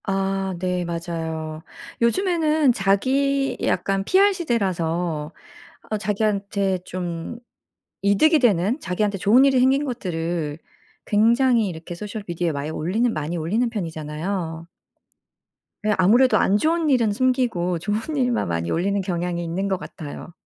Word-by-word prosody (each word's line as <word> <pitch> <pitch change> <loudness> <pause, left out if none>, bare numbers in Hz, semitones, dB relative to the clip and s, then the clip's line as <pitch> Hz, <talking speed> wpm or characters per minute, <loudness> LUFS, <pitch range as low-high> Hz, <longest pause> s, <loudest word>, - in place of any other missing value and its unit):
아 195 -1 -1
네 180 0 -1
맞아요. 165 -2 -4 0.4
요즘에는 310 0 +2
자기 270 +8 +1
약간 195 +2 0
PR 395 - +4
시대라서 175 - -1 0.6
아 215 - -1
자기한테 200 -2 0
좀 175 +3 -5 0.6
이득이 300 - +4
되는 220 - +2
자기한테 200 -2 -1
좋은 235 +9 +5
일이 270 -2 +4
생긴 265 +3 +3
것들을 170 - -3 0.5
굉장히 230 +2 +3
이렇게 165 0 -7
소셜 210 +3 -6
미디어에 170 -1 -1
많이 145 +2 -4
올리는 215 +10 0
많이 155 +3 -3
올리는 210 +10 0
편이잖아요. 165 -2 -4 1.2
네 215 0 +2
아무래도 215 +5 +5
안 200 +1 +3
좋은 320 +1 +1
일은 235 -5 +3
숨기고 230 -7 0
좋은 215 - -2
일만 250 -4 +1
많이 85 0 -2
올리는 200 +4 0
경향이 175 -2 -2
있는 175 +4 -2
것 190 -2 -1
같아요. 155 -2 -9
195 Hz, 295 characters per minute, -23 LUFS, 170-240 Hz, 1.2 s, 좋은